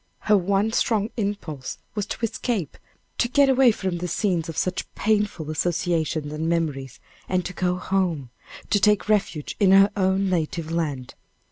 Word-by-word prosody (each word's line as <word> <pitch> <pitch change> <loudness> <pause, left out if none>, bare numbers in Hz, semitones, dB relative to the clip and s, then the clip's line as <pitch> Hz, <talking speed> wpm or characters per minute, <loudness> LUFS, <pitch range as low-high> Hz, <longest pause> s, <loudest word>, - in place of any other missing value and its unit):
Her 210 - +3
one 200 +3 +1
strong 220 -2 +1
impulse 200 - -4 0.2
was 210 -2 -3
to - - -4
escape, 215 - -3 0.4
to 240 - +2
get 280 +1 +4
away 265 -1 +5
from 185 -4 -3
the 180 - -3
scenes 175 -4 -1
of 165 - -6
such 185 0 -2
painful 205 -7 0
associations 160 -2 -1
and 160 +2 -2
memories, 145 -6 -2 0.3
and 185 -1 0
to 180 - -5
go 180 -1 0
home, 180 -8 -1 0.4
to 205 - +4
take 210 +1 +3
refuge 195 -8 0
in 200 -3 +4
her 195 +1 +6
own 190 0 +1
native 165 -2 -2
land. 145 -7 -2
185 Hz, 160 wpm, -24 LUFS, 160-205 Hz, 0.4 s, her